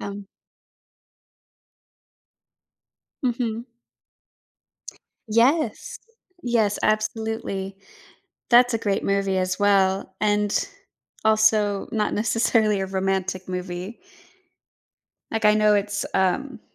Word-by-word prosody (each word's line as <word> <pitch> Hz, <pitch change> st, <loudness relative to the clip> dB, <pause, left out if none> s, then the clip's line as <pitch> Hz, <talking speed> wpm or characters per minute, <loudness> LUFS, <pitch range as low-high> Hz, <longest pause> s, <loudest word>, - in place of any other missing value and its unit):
Um. 200 Hz, 0 st, -7 dB, 3.0 s
Mhm. 235 Hz, -2 st, -2 dB, 1.6 s
Yes, 255 Hz, +9 st, +1 dB, 0.4 s
yes, 225 Hz, -4 st, +1 dB
absolutely. 215 Hz, -3 st, -2 dB, 0.7 s
That's 245 Hz, 0 st, +6 dB
a 230 Hz, -, +2 dB
great 200 Hz, -2 st, -1 dB
movie 195 Hz, -1 st, 0 dB
as 185 Hz, 0 st, -1 dB
well 195 Hz, -1 st, +2 dB
and 210 Hz, -, +1 dB, 0.6 s
also 215 Hz, -2 st, +3 dB
not 210 Hz, -2 st, -1 dB
necessarily 220 Hz, -2 st, +1 dB
a 190 Hz, -, -1 dB
romantic 190 Hz, -1 st, -2 dB
movie. 180 Hz, +3 st, -5 dB, 1.3 s
Like 220 Hz, -1 st, -3 dB
I 210 Hz, 0 st, +6 dB
know 215 Hz, 0 st, +4 dB
it's, 205 Hz, 0 st, -1 dB
um 230 Hz, +7 st, 0 dB
210 Hz, 80 wpm, -23 LUFS, 195-225 Hz, 3.0 s, That's